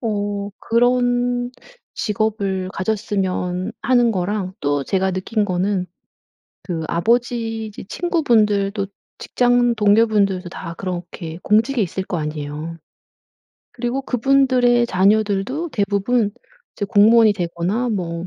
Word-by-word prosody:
어 205 -3 -2
그런 245 +1 +1 0.4
직업을 205 -4 -1
가졌으면 190 -1 -2
하는 245 -2 +3
거랑 190 -1 -2
또 145 -1 0
제가 190 +4 0
느낀 205 +3 -1
거는 185 0 -1 0.8
그 165 -3 -4
아버지 225 +3 0
이제 210 - -9
친구분들도 215 - +1 0.3
직장 245 -1 +2
동료분들도 205 -4 +2
다 170 0 -7
그렇게 175 -2 -6
공직에 225 +4 +2
있을 190 +2 -3
거 180 -2 -4
아니에요. 150 +1 -5 1.0
그리고 250 +2 -2
그분들의 250 -2 +3
자녀들도 210 - +1
대부분 205 +2 +1 0.5
이제 205 - -2
공무원이 215 +2 +5
되거나 180 +6 -2
뭐 175 -4 -3
205 Hz, 255 characters per minute, -20 LUFS, 185-235 Hz, 1.0 s, 공무원이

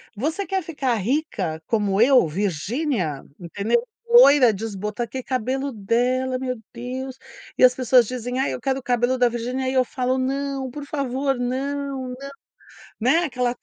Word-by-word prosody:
"Você 315 - -2
quer 385 -1 -1
ficar 290 -6 -2
rica 205 - -2
como 205 -3 0
eu, 250 - +5
Virginia", 190 - -2 0.2
entendeu? 200 - 0 0.2
"Loira, 290 - +7
desbota" 210 +2 -4
Ah, - - -5
que 260 +1 -6
cabelo 265 +2 -2
dela, 250 +4 0
meu 255 -1 -3
Deus. 255 +2 -6 0.4
E - - +3
as 250 0 +8
pessoas 250 -2 +4
dizem: 250 0 -4
"Ai, 270 - 0
eu - - -6
quero 270 -1 0
o - - -14
cabelo 245 +1 +1
da 250 -1 +4
Virginia." 250 +3 -3
E 260 - -1
eu 255 -1 +4
falo: 255 0 -1
"Não, 270 0 -2
por 285 +3 -8
favor, 275 -2 -1
não, 270 +1 -3
não", 250 - -6 0.9
né, 265 +8 +4
aquela. 250 -3 -1
255 Hz, 165 wpm, -23 LUFS, 235-270 Hz, 0.9 s, as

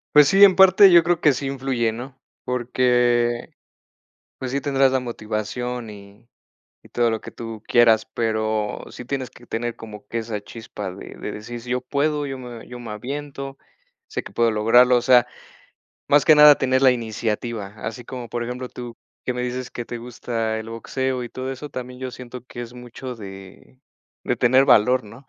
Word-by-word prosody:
Pues 150 -1 +8
sí, 195 +5 +6
en 190 -3 +8
parte 190 +1 +7
yo 170 -1 +7
creo 170 0 +1
que 150 -3 +5
sí 135 +2 -4
influye, 130 -4 -1
¿no?, 125 +4 -8 0.3
porque, 120 -1 +1 0.9
pues 130 - -4
sí, 140 +2 -1
tendrás 135 -2 +2
la 130 - +1
motivación 120 +1 -4
y 100 +2 -14 0.6
y - - -17
todo 120 -1 +1
lo 110 - -3
que - - -9
tú 115 -2 -8
quieras, 115 -2 +5
pero 110 -2 -1
sí 125 - -10
tienes 130 -1 -3
que 120 - -17
tener 120 +1 -3
como 105 -2 -11
que 115 - -4
esa 110 -2 -4
chispa 105 -3 -8
de 100 - -10
de - - -6
decir: 120 +3 -7
"Sí, 120 - -11
yo 125 0 0
puedo, 145 +3 -1
yo 135 -1 -5
me 120 -2 -9
yo 125 - -8
me 120 -2 -8
aviento, 135 +4 -6 0.5
sé - - -4
que - - -11
puedo 115 -1 +2
lograrlo", 120 +4 +5
o 120 - +3
sea, 125 -1 +5 0.8
más 145 -1 +4
que 155 - +8
nada 150 -1 +9
tener 130 0 +1
la 135 - +7
iniciativa. 115 -2 -3
Así 115 +3 -6
como, 125 0 -7
por 120 +1 -3
ejemplo, 125 +1 -5
tú 120 -2 -9 0.3
que 125 - -1
me 125 0 -3
dices 125 0 -4
que 120 - -6
te 120 - -6
gusta 115 -2 -3
el 110 +1 -8
boxeo 130 +2 -3
y 120 - -7
todo 130 +1 -5
eso, 140 +3 -7
también 125 0 -7
yo 130 -1 -4
siento 125 -1 -10
que 120 - -8
es 120 0 -8
mucho 125 +1 -8
de 95 +3 -12 0.5
de - - 0
tener 130 +3 +4
valor, 125 0 +4
¿no?, 115 +6 -14
125 Hz, 195 wpm, -22 LUFS, 115-130 Hz, 0.9 s, nada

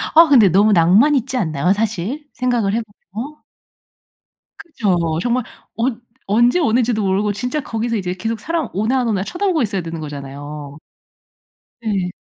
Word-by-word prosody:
아 330 +1 +9
근데 230 -9 +6
너무 205 +5 +4
낭만 195 - +5
있지 260 0 -1
않나요 170 - +1
사실? 225 - -3
생각을 240 -5 0
해 230 - +1 0.3
보면? 270 +9 -6 1.2
그죠. 180 - -1
정말 245 0 0 0.3
언 235 0 -1 0.3
언제 240 - +3
오는지도 240 -6 +1
모르고 200 +2 +1
진짜 250 +8 -2
거기서 230 -2 -2
이제 180 -3 -2
계속 225 +5 -3
사람 325 -2 -2
오나 225 +6 +1
안 245 - -1
오나 200 -4 0
쳐다보고 355 - 0
있어야 200 -3 -1
되는 165 0 -6
거잖아요. 145 0 -8 1.0
네. 195 -5 -1
220 Hz, 315 characters per minute, -19 LUFS, 185-250 Hz, 1.2 s, 아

